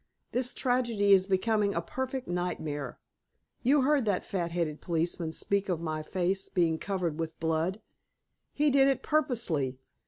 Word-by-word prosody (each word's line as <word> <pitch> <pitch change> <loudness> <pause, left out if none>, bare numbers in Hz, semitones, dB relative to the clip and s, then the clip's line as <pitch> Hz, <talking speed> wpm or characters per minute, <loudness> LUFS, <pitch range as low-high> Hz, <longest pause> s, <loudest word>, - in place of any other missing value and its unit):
This 250 0 0
tragedy 240 -6 +2
is 190 -1 +5
becoming 205 +1 +1
a 170 - +1
perfect 260 +6 -4
nightmare. 155 -7 -3 0.6
You 275 +2 +4
heard 280 -2 +3
that 200 -3 0
fat 175 -3 -2
headed 165 -3 -2
policeman 165 -1 -1
speak 200 +4 -1
of 175 -3 0
my 155 -2 -3
face 185 +4 -1
being 165 -3 +1
covered 180 -6 -2
with 160 -1 -4
blood. 165 +5 0 0.7
He 295 0 +2
did 270 0 +5
it 270 -1 +1
purposely. 230 - 0
190 Hz, 150 wpm, -29 LUFS, 165-245 Hz, 0.7 s, is